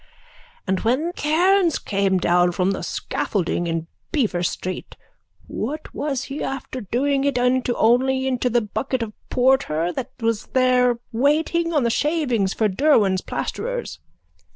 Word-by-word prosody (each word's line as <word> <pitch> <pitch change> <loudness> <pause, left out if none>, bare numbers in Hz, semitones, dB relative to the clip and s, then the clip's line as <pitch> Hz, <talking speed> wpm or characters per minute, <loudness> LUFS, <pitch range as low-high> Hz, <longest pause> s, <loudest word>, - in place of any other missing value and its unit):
_ - - -30 0.6
And 190 -1 0
when 275 +10 0
Cairns 350 +3 +2
came 195 -2 0
down 175 0 +3
from 185 +2 +1
the 195 - -3
scaffolding 175 -3 -2
in 165 -1 -2 0.3
Beaver 225 - 0
street 185 +1 -4 0.5
what 295 +8 -5
was 280 -3 -2
he 285 +1 -6
after 260 -1 -5
doing 270 +7 0
it 280 -2 +1
into 250 0 +1
only 260 +3 +3
into 255 -1 0
the 240 0 +2
bucket 240 +4 -2
of 215 -2 -7 0.2
porter 245 - +2
that 260 -1 -4
was 230 -2 -1
there 250 -2 +3
waiting 310 +7 +1
on 295 -5 +2
the 235 - +1
shavings 255 - +1
for 220 - +1
Derwan's 200 -4 +3
plasterers. - - -4
250 Hz, 145 wpm, -22 LUFS, 200-280 Hz, 0.6 s, down